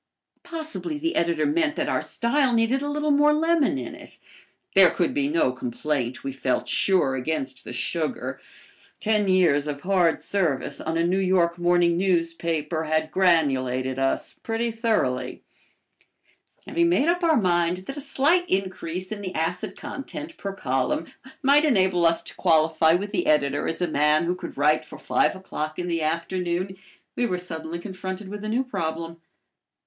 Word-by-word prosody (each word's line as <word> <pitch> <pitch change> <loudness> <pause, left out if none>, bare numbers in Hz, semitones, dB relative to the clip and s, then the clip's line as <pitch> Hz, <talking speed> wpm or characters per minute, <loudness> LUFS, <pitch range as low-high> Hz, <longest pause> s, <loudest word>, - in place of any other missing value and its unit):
Possibly 320 -1 -5
the 330 +3 -2
editor 170 - +1
meant 315 0 +1
that - - -1
our - - 0
style 250 +2 +1
needed 230 +4 +2
a 290 - -2
little 300 +1 0
more 295 +1 +4
lemon 320 - +2
in 125 - -6
it. - - -13 0.6
There - - +8
could - - 0
be 140 -1 0
no 150 -3 +2
complaint, 125 0 -3
we 135 - -3
felt 130 -1 -1
sure, 185 -9 +2
against 160 - -3
the - - -8
sugar. - - -2 0.6
Ten 210 -2 +1
years 170 -6 +3
of 145 -1 -4
hard 180 -3 +2
service 170 -10 -1
on 160 +1 -2
a 165 - +2
New 185 +2 +1
York 180 -2 +2
morning 175 -1 +3
newspaper 165 -3 -1
had 155 0 0
granulated 135 -8 +1
us 135 0 0
pretty 230 +1 -3
thoroughly. 220 - -1 1.2
Having 340 0 +1
made 325 -3 +2
up 350 +1 +1
our 320 -3 +4
mind 175 -3 +2
that 275 - -6
a 290 - -6
slight 315 +6 +2
increase 185 -1 -2
in 210 -1 -5
the 185 -2 -6
acid 180 +5 -2
content 295 +2 -7
per 200 - -5
column 135 -2 -2 0.3
might 285 +3 +5
enable 190 - +3
us 165 0 +1
to - - -6
qualify 160 -1 +3
with 200 +4 -1
the 210 - -1
editor 145 -2 +2
as 165 - -1
a - - +1
man 150 +1 +3
who 175 +1 0
could 180 - -8
write 150 +2 +3
for - - -11
five - - +1
o'clock 155 -5 -5
in 180 - -3
the 165 -2 -1
afternoon, 175 +3 -2 0.4
we 245 - +1
were 180 - -1
suddenly 165 -2 -6
confronted 190 +1 -6
with 210 +1 -7
a 215 - -3
new 240 +4 +1
problem. 165 -7 -4
180 Hz, 170 wpm, -24 LUFS, 160-230 Hz, 1.2 s, There